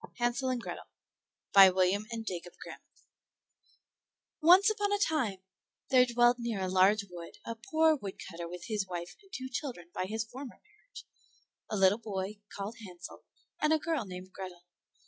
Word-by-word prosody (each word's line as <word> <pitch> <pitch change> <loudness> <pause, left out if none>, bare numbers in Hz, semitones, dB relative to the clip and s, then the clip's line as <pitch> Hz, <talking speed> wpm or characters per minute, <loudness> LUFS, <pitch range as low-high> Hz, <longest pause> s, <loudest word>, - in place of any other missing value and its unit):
HANSEL 240 +2 0
AND 250 -2 -1
GRETHEL - - -7 0.7
By 195 -1 +10
William 190 +3 +1
and 225 -1 -5
Jacob 175 -3 -5
Grimm - - -9 1.6
Once 360 +6 +7
upon 415 -2 +1
a 410 - +3
time 250 - 0 0.5
there 255 -1 +6
dwelt 240 +1 +4
near 235 -4 -2
a 190 - -1
large 190 +3 +4
wood 170 -1 -9
a 230 - -3 0.2
poor 315 -1 +4
woodcutter 190 - -7
with 175 0 -8
his 210 -4 -2
wife 175 -1 -6
and 390 -1 -23
two 260 -6 -5
children 250 - -5
by 185 - -2
his 220 +3 -2
former 255 +3 -9
marriage, 425 +4 -15 0.6
a 215 - -1
little 195 +3 +4
boy 205 -1 -4
called 200 +3 -6
Hansel 180 -3 -10 0.4
and 305 - +3
a 315 - +5
girl 310 -4 -1
named 185 0 -9
Grethel. 185 -2 -8
215 Hz, 165 wpm, -31 LUFS, 185-265 Hz, 1.6 s, By